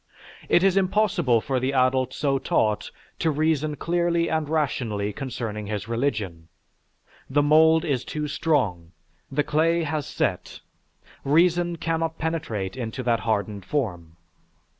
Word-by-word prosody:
It 175 - +4
is 195 0 +3
impossible 185 - +2
for 130 +1 -1
the 130 +2 -1
adult 130 -1 +2
so 135 0 0
taught 105 -4 0 0.3
to 165 - +1
reason 155 0 0
clearly 170 +1 0
and 155 -2 -1
rationally 115 -10 -1
concerning 115 -4 -5
his 105 0 -4
religion; 110 -9 -2 0.8
the 145 +2 +2
mould 160 +2 +5
is 140 -6 0
too 150 0 -4
strong, 105 - -1 0.4
the 145 +2 +1
clay 165 +3 +2
has 150 -2 -2
set, - - -2 0.6
reason 170 +3 +3
cannot 165 0 -2
penetrate 155 - -3
into 125 0 -4
that 115 -2 +2
hardened 105 -2 -2
form. 90 - -3
140 Hz, 130 wpm, -24 LUFS, 110-160 Hz, 0.8 s, mould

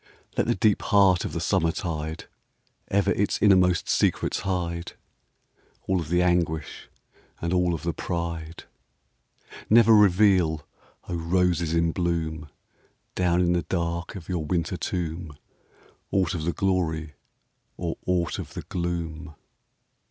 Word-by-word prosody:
Let - - +1
the - - +2
deep 105 +1 +2
heart 95 -3 +4
of - - -4
the 85 - -2
summertide 80 -3 -1 0.6
Ever 100 0 +2
its 100 - 0
innermost 90 -3 +4
secrets - - +1
hide, 85 -2 -3 0.5
— - - -38
All 95 -1 +1
of 80 -3 -5
the 90 +1 +3
anguish 85 -3 -1 0.5
and 85 +1 -2
all 90 -1 +2
of 80 - -8
the 85 -1 -1
pride. 85 0 -4 1.1
Never 115 0 +7
reveal, 90 -6 +4 0.4
O 90 - -4
roses 85 -1 +1
in 85 0 +2
bloom, 80 -3 -2 0.6
Down 90 -1 +2
in 90 -1 +2
the 90 - +1
dark 85 0 -3
of 90 -4 -9
your 90 -4 -2
winter 85 +3 -1
tomb, 85 -4 -4 0.7
Aught 95 -3 +1
of 80 -3 -3
the 85 - 0
glory 80 -5 -1 0.6
or 85 -2 -3
aught 90 -2 0
of - - -8
the - - -5
gloom 85 -2 -4
85 Hz, 135 wpm, -25 LUFS, 80-90 Hz, 1.1 s, Never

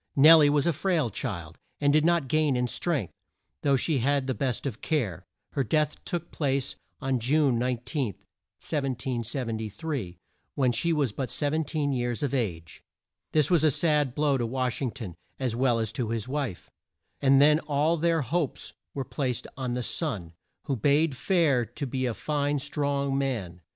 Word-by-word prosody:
Nel 155 +4 +9
lie 145 -1 +6
was 145 0 +2
a 170 - +2
frail 155 - 0
child, 85 -4 -5 0.2
and 145 0 +3
did 155 0 +4
not 170 -4 +2
gain 155 0 +2
in 125 0 +1
strength, 135 - -1 0.5
though 140 -1 +3
she 140 +2 +1
had 140 +2 +1
the 130 - -1
best 130 -2 -2
of 120 -5 -4
care. 100 - -1 0.2
Her 140 - 0
death 150 +4 0
took 170 -1 -4
place 140 -2 0 0.4
June 135 0 +2
19, 125 - -2 0.5
1773, 125 - -3 0.4
when 130 -4 +2
she 145 +8 0
was 145 -7 +1
but 130 +4 -4
17 150 0 -1
years 120 0 -1
of 140 -2 -1
age. 85 -11 -3 0.5
This 155 +1 +3
was 170 -4 +4
a 155 - +6
sad 150 -3 +1
blow 145 -3 +2
to 120 - 0
Wash 130 +1 -1
ing 130 - 0
ton, 110 -8 -7 0.3
as 125 -4 -1
well 125 -1 +2
as 110 -2 -1
to 115 -1 -3
his 115 -1 -2
wife, 135 -9 -4 0.5
and 135 0 +5
then 150 +2 +6
all 150 +1 +1
their 165 -1 +1
hopes 150 +3 -2 0.2
were 135 -2 -2
placed 130 -5 -2
on 125 -2 -3
the 125 0 -2
son, 105 - -3 0.3
who 140 - -1
bade 145 +5 +2
fair 155 -6 +2
to 120 +6 -6
be 130 0 -1
a 115 - -2
fine 145 -1 0
strong 140 -1 -1
man. 105 -11 -3
135 Hz, 170 wpm, -27 LUFS, 120-150 Hz, 0.5 s, Nel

